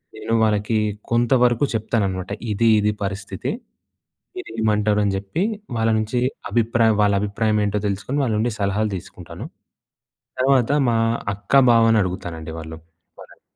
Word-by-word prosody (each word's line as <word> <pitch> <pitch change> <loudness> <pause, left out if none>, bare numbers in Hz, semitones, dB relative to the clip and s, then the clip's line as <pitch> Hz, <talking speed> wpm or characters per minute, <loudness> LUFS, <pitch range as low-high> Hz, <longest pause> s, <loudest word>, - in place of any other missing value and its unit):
నేను 115 - -4
వాళ్ళకి 105 +1 +1 0.3
కొంతవరకు 120 +1 +3
చెప్తాననమాట. 100 -4 -2 0.2
ఇది 115 +3 +1
ఇది 105 0 +1
పరిస్థితి. 95 -1 -4 0.8
మీరు 370 - -7
ఏమంటారు? 105 -1 +2
అని 100 - 0
చెప్పి 100 - -3 0.3
వాళ్ళ 110 0 +1
నుంచి 110 +3 -1 0.3
అభిప్రాయ 115 -1 +2
వాళ్ళ 100 -1 +3
అభిప్రాయం 105 +1 0
ఏంటో 105 +1 -1
తెలుసుకొని 100 +8 -3
వాళ్ళ 115 -4 0
నుండి 115 +2 0
సలహాలు 100 +2 0
తీసుకుంటాను. 90 - -9 0.9
తర్వాత 130 -1 +3 0.2
మా 115 - +1 0.4
అక్కా, 100 +8 +2
బావని 115 -1 +4
అడుగుతానండి. 85 -3 -5
వాళ్ళు 80 0 -8 0.4
వాళ్లని. - - -15
110 Hz, 130 wpm, -21 LUFS, 100-115 Hz, 0.9 s, బావని